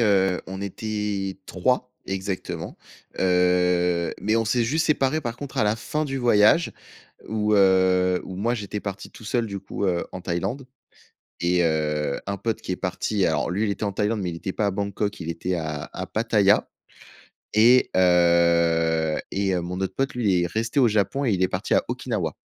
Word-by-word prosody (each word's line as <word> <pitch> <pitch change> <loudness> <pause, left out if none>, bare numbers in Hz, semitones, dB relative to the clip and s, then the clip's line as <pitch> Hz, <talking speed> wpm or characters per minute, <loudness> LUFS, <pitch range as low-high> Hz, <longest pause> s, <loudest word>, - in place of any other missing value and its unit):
heu, 95 -4 +3
on 95 +1 -6
était 100 -1 -3
3 125 +6 0 0.2
exactement. 95 -3 -4 0.4
Heu, 90 -1 +2
mais 110 +2 +1
on 115 - +1
s'est 115 +1 +1
juste 155 +7 +1
séparés, 150 0 +1
par 120 -2 -4
contre 140 0 -8
à - - +3
la 105 +1 +1
fin 150 +7 -2
du 135 -2 -3
voyage, 120 +6 +4 0.6
où, 105 -1 +1
heu, 95 -2 +4
où 95 - -7
moi, 115 +5 0
j'étais 105 -2 -5
parti 100 -1 -6
tout 110 - -14
seul, 115 +1 0
du 100 -1 -5
coup, 100 - -5
heu, 85 -2 0
en 95 - -6
Thaïlande 95 +10 -3 0.8
et 90 0 +2
heu, 75 -3 0
un 100 0 -2
pote 110 +3 -3
qui - - -5
est - - 0
parti, 95 +2 -1
alors 80 - 0
lui, 100 +5 -1
il 105 - +1
était 100 - -4
en 100 - 0
Thaïlande, 105 +1 0
mais 90 - -2
il 85 - -5
était 95 +3 -5
pas 105 - 0
à - - 0
Bangkok, 100 +1 -3
il 85 -2 -5
était 90 +2 -2
à 80 -3 -4
à - - -4
Pattaya. 105 -3 +2 0.9
Et 120 +4 +5
heu 85 -3 +3
et 100 -1 0
heu, 90 - -1
mon 90 +2 -5
autre 95 -1 -3
pote, 135 +2 -1
lui, 115 -4 +1
il - - +1
est - - 0
resté 115 - -1
au 120 - +6
Japon 105 +7 0
et 115 - +2
il 95 - 0
est - - +3
parti 90 +2 -2
à - - +3
Okinawa. 110 - -3
100 Hz, 200 wpm, -24 LUFS, 90-110 Hz, 0.9 s, au